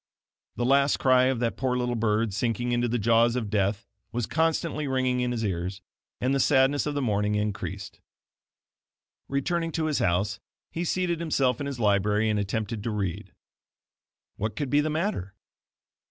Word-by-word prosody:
The 120 - -1
last 140 +2 +4
cry 130 -1 +4
of 130 -2 +1
that 115 -5 -1
poor 130 -1 0
little 125 -1 -1
bird 110 -2 0
sinking 120 +2 -1
into 120 0 +1
the 120 +1 0
jaws 115 +2 +3
of 110 -5 -3
death 100 +1 0 0.3
was 120 0 -1
constantly 160 0 0
ringing 130 -1 +1
in 125 0 0
his 115 -2 -2
ears, 90 0 -3 0.4
and 130 +2 +1
the 135 - +1
sadness 135 +1 +3
of 145 - -2
the 145 - 0
morning 105 -2 +1
increased. 105 -1 -4 1.3
Returning 165 +4 -1
to 160 - 0
his 155 -2 0
house, 100 +3 0 0.3
he 170 - -3
seated 175 -1 0
himself 135 -7 +1
in 145 - -3
his 140 -3 -5
library 105 0 +2
and 105 - 0
attempted 105 +2 -2
to 115 - -3
read. 100 -2 -3 1.1
What 110 +2 -3
could 145 -4 -3
be 145 +1 +4
the 155 - -1
matter? 155 - -2
120 Hz, 170 wpm, -27 LUFS, 105-140 Hz, 1.3 s, last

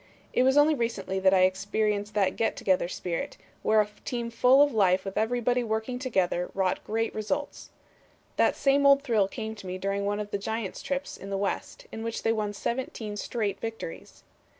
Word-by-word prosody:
It - - +3
was 265 +2 +4
only 295 +2 +6
recently 220 -7 -2
that 190 0 +4
I 190 -1 +4
experienced 205 +2 0
that 195 -3 +2
get 225 - 0
together 185 -3 +1
spirit, 175 -1 -4 0.2
where 215 0 +4
a 210 - -3
team 235 -2 -3
full 250 +4 +6
of 290 - +1
life 190 -3 +3
with 195 - -5
everybody 245 +2 +1
working 220 +2 -2
together 185 -8 0
wrought 190 -1 0
great 225 +1 -1
results. 280 +7 -3 0.7
That - - +3
same 280 0 +3
old 280 0 +6
thrill 220 -7 +2
came 220 +1 -5
to 205 -3 -10
me 185 0 -4
during 195 +1 -2
one 205 +1 -1
of 205 -1 -5
the 200 - -1
Giants' 220 -1 -4
trips 275 0 -3
in 195 - -9
the 195 - -1
West 200 0 -3
in 225 - -6
which 230 0 -4
they 225 - +3
won 210 -2 -1
seventeen 225 -1 -4
straight 205 -1 -2
victories. 225 -7 -7
215 Hz, 195 wpm, -28 LUFS, 195-240 Hz, 0.7 s, only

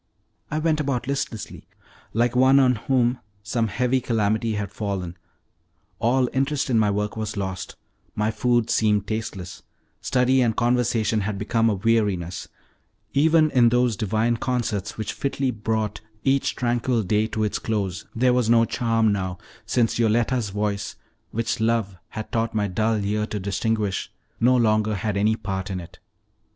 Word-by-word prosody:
I 155 - -2
went 155 0 +1
about 135 -4 -1
listlessly, 130 -5 -4 0.4
like 120 +2 +1
one 130 +2 +6
on 130 -2 +5
whom 125 +2 +1 0.2
some 115 +2 0
heavy 125 +3 +1
calamity 110 -1 0
has 105 -2 -3
fallen: 95 -5 -4 0.8
all 125 +2 +2
interest 135 0 0
in 115 - +4
my 105 -1 +3
work 105 0 -1
was 110 -2 -4
lost; 95 -1 -4 0.4
my 105 +1 +1
food 120 0 +1
seemed 105 -2 +2
tasteless; 100 -4 -5 0.4
study 130 +1 +2
and 115 -3 +2
conversation 120 -3 +1
had 100 0 -2
become 115 +3 +1
a 105 - +1
weariness; 95 -5 0 0.7
even 155 +1 +4
in 120 -3 +5
those 125 -1 +2
divine 110 +3 0
concerts, 110 -6 -2
which 110 - -3
fitly 135 -1 -1
brought 110 -1 -2 0.2
each 135 0 +1
tranquil 120 -1 0
day 105 +3 +1
to 110 -1 -2
its 105 - -1
close, 100 -5 -2
there 125 +2 +3
was 125 -3 +1
no 115 0 +5
charm 115 -2 +1
now, 95 -2 -3 0.3
since 115 -1 +1
Yoletta's 115 0 +2
voice, 105 0 -2 0.3
which 115 0 -2
love 110 -3 0
had 110 - -7
taught 115 0 -1
my 105 -1 +1
dull 110 +2 0
ear 105 +1 0
to 105 - -4
distinguish 100 +1 -1 0.3
no 125 +2 +4
longer 110 -2 +2
had 105 +1 -2
any 105 +2 +2
part 95 -2 -4
in 95 -1 -3
it. 85 - -12
110 Hz, 155 wpm, -24 LUFS, 105-125 Hz, 0.8 s, one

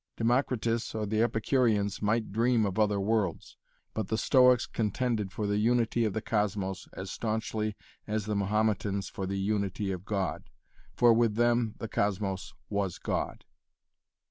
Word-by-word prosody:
Democritus 115 -1 0
or 110 -1 -1
the 110 +2 0
Epicureans 110 -3 +1
might 110 +1 0
dream 115 +1 +2
of 100 +1 -2
other 105 -2 +2
worlds, 100 -3 -1 0.4
but 110 -3 -2
the 110 - -1
Stoics 125 -1 +5
contended 110 -2 -1
for 105 +2 -3
the 105 0 +1
unity 120 +1 +2
of 105 - -1
the 110 - -3
cosmos 100 -3 -1
as 95 0 -6
staunchly 110 -1 -2 0.3
as 105 -1 -1
the 105 0 -1
Mahometans 100 -1 0
for 95 - -4
the 100 +1 -2
unity 100 0 -1
of 90 -1 -5
God, 100 -3 -3 0.5
for 120 -1 +6
with 115 -2 +2
them 120 -1 +2
the 115 - -5
cosmos 95 -3 -1 0.2
was 100 -3 -2
God. - - -3
105 Hz, 150 wpm, -29 LUFS, 100-115 Hz, 0.5 s, for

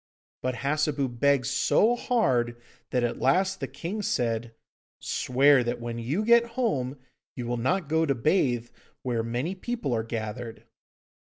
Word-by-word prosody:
But 130 0 -1
Hassebu 140 +2 0
begged 140 -2 +3
so 205 - +3
hard 125 - +1 0.3
that 125 -1 0
at 120 - -1
last 185 +8 +2
the - - -3
king 195 +6 -5
said, 115 - -1 0.4
'Swear 135 +1 +3
that 120 +1 -2
when 120 0 -5
you 145 - -1
get 235 +1 +6
home 140 - 0 0.4
you 125 - -5
will 120 +1 -1
not 160 +8 0
go 160 +1 +2
to 140 - +2
bathe 120 -3 +1 0.3
where 120 -3 0
many 120 +10 -2
people 210 - -3
are 115 - +1
gathered. 115 +1 -5
130 Hz, 150 wpm, -27 LUFS, 120-165 Hz, 0.4 s, get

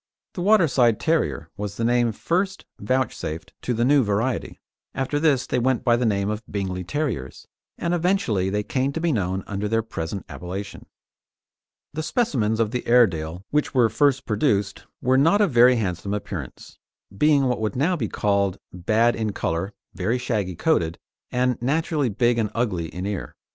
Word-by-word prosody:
The 180 - -5
Waterside 155 - +4
Terrier 160 0 0
was 100 -1 -5
the 115 - -2
name 120 0 +2
first 185 - -1
vouchsafed 105 -8 -2
to - - -2
the 120 0 +1
new 140 0 +5
variety. 110 +5 -1 0.4
After 135 +2 -1
this 145 -5 +2
they 125 - 0
went 130 0 +1
by 120 -2 +4
the 120 0 +1
name 100 -2 0
of 105 +1 -2
Bingley 95 -2 -3
Terriers, 95 - -4 0.3
and 170 0 -1
eventually 170 - +1
they 105 +1 -1
came 130 +5 -1
to 165 - -2
be 170 0 +1
known 95 -5 -1
under 100 +1 -3
their 115 +1 +1
present 90 -3 -5
appellation. 90 +7 -7 1.1
The 155 - -3
specimens 125 - 0
of 110 -2 +1
the 125 0 -3
Airedale 90 -7 +2
which 150 -1 0
were 120 -3 +5
first 140 +1 +2
produced 105 -2 0 0.2
were 130 +1 +4
not 165 +9 +4
of 205 -6 +3
very 125 +1 +6
handsome 100 -2 -2
appearance, 105 - -7 0.4
being 150 +4 +4
what 125 -3 0
would 105 -2 -1
now 160 +8 +2
be 120 -10 -2
called 100 -2 +1 0.2
bad 110 +7 +2
in 110 -2 -2
colour, 90 +1 -2 0.2
very 100 +7 0
shaggy 105 -7 -2
coated, 85 - +1 0.3
and 125 -1 0
naturally 150 +1 0
big 120 +3 +1
and 110 -2 0
ugly 100 -9 -1
in 90 +3 -6
ear. 100 -2 -4
115 Hz, 170 wpm, -23 LUFS, 100-135 Hz, 1.1 s, very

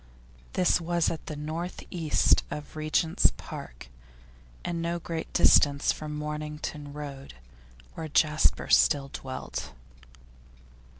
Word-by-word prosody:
This 180 -1 +3
was 170 0 +1
at 160 - -7
the 155 - -4
north 160 +4 -5
east 165 -4 +3
of 150 0 -7
Regent's 155 +1 +2
Park, - - -9 0.8
and 170 -1 -2
no 170 +1 -1
great 165 -1 -5
distance 140 0 +5
from 150 -1 -5
Mornington 150 -1 -5
Road, 140 - -8 0.6
where 160 - -5
Jasper 155 0 +2
still 140 -2 +4
dwelt. 130 -1 -6
155 Hz, 110 wpm, -28 LUFS, 145-165 Hz, 0.8 s, distance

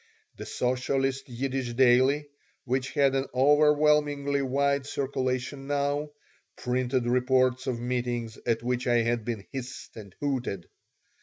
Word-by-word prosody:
The - - -7
socialist 135 +2 -1
Yiddish 130 0 -3
daily, 130 +4 +4 0.4
which 130 +1 -1
had 140 -3 +3
an 135 0 0
overwhelmingly 145 0 +3
wide 140 +1 0
circulation 135 0 -2
now, 145 +1 -1 0.5
printed 125 0 -1
reports 130 +1 +2
of 125 -3 -1
meetings 120 -2 -2
at 115 -1 +1
which 125 0 -1
I 120 -1 +3
had 115 0 0
been 110 -5 -4
hissed 130 -1 -7
and 105 -4 -10
hooted. 125 -10 -2
130 Hz, 125 wpm, -27 LUFS, 125-140 Hz, 0.5 s, daily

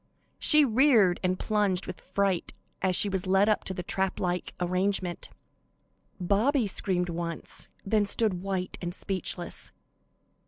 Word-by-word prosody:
She 305 -1 +6
reared 230 -7 +4
and 185 0 0
plunged 205 -4 0
with - - -8
fright 190 -2 -1 0.3
as 185 -1 +1
she 205 - +4
was 190 -1 -2
led 195 +2 +3
up 215 - +1
to 190 - -3
the 180 - -5
trap 190 +2 -1
like 180 0 -3
arrangement. 180 0 -1 0.9
Bobby 220 +8 +1
screamed 180 -2 0
once, 170 -1 -5 0.2
then 205 0 +1
stood 200 -4 +3
white 190 -1 -4
and 175 0 -1
speechless. 185 -3 -2
190 Hz, 135 wpm, -27 LUFS, 180-205 Hz, 0.9 s, She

